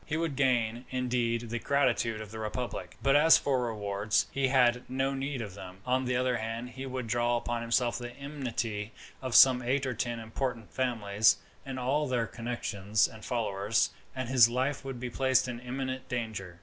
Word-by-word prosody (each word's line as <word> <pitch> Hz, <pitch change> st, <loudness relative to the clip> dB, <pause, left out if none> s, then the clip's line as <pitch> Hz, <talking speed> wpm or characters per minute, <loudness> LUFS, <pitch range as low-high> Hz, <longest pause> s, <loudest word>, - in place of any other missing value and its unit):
He 155 Hz, -, -2 dB
would 165 Hz, -3 st, -1 dB
gain, 120 Hz, -3 st, +1 dB
indeed, 120 Hz, -2 st, -1 dB
the 120 Hz, -, -1 dB
gratitude 115 Hz, -5 st, +1 dB
of 105 Hz, -2 st, -9 dB
the 110 Hz, -, -7 dB
republic; 110 Hz, 0 st, -4 dB
but 135 Hz, +2 st, +4 dB
as 160 Hz, +3 st, +7 dB
for 130 Hz, -3 st, 0 dB
rewards, 105 Hz, -1 st, 0 dB
he 135 Hz, -1 st, +1 dB
had 125 Hz, -2 st, +4 dB
no 135 Hz, +1 st, 0 dB
need 135 Hz, -2 st, -3 dB
of 100 Hz, -4 st, -8 dB
them. 95 Hz, -1 st, -10 dB
On 130 Hz, +1 st, +1 dB
the 125 Hz, 0 st, 0 dB
other 125 Hz, -1 st, +1 dB
hand, 115 Hz, +2 st, -4 dB
he 135 Hz, +1 st, -7 dB
would 130 Hz, -1 st, -4 dB
draw 120 Hz, +1 st, +1 dB
upon 120 Hz, 0 st, -3 dB
himself 115 Hz, +1 st, +1 dB
the 120 Hz, 0 st, -6 dB
enmity 125 Hz, -7 st, -4 dB, 0.3 s
of 130 Hz, -3 st, -3 dB
some 130 Hz, -2 st, +8 dB
eight 135 Hz, +3 st, 0 dB
or 130 Hz, -, -1 dB
ten 120 Hz, 0 st, -2 dB
important 115 Hz, 0 st, -4 dB
families, 110 Hz, -4 st, +2 dB, 0.3 s
and 135 Hz, -1 st, -4 dB
all 140 Hz, +4 st, 0 dB
their 125 Hz, -3 st, 0 dB
connections 110 Hz, -3 st, -1 dB
and 110 Hz, -2 st, -13 dB
followers, 110 Hz, -3 st, 0 dB, 0.2 s
and 130 Hz, -2 st, -3 dB
his 125 Hz, -2 st, +6 dB
life 130 Hz, +4 st, -1 dB
would 135 Hz, -2 st, -6 dB
be 125 Hz, 0 st, -4 dB
placed 130 Hz, 0 st, +2 dB
in 120 Hz, -1 st, -5 dB
imminent 130 Hz, +1 st, -4 dB
danger. 110 Hz, -7 st, -4 dB
120 Hz, 190 wpm, -30 LUFS, 115-130 Hz, 0.3 s, some